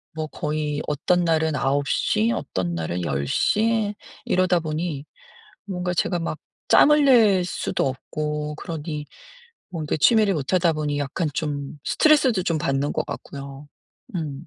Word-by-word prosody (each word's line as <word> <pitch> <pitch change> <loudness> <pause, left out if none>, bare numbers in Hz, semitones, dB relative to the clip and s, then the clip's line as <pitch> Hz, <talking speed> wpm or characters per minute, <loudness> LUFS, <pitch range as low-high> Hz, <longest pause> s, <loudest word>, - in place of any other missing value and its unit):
뭐 155 -1 -3
거의 150 -2 -3
어떤 175 +5 +1
날은 160 -2 +1
9 140 +2 0
시, 220 +2 +1
어떤 95 - -2
날은 85 +2 -3
10 70 -2 -2
시 215 - +1 0.3
이러다 185 -1 +2
보니 155 -2 -3 0.6
뭔가 180 -2 -3
제가 175 +1 0
막 160 -2 -3 0.3
짬을 300 0 +6
낼 210 -8 +5
수도 175 - -1
없고 150 +3 -4
그러니 150 -2 -5 0.6
뭔가 160 -3 -2
취미를 215 +1 +4
못하다 165 +3 +1
보니 145 -1 -2
약간 145 +4 -2
좀 145 -1 -3
스트레스도 275 -10 +3
좀 165 -4 0
받는 135 0 0
것 - - -1
같고요. 140 +1 -8 0.5
음. 155 -2 -4
155 Hz, 245 characters per minute, -23 LUFS, 145-180 Hz, 0.6 s, 짬을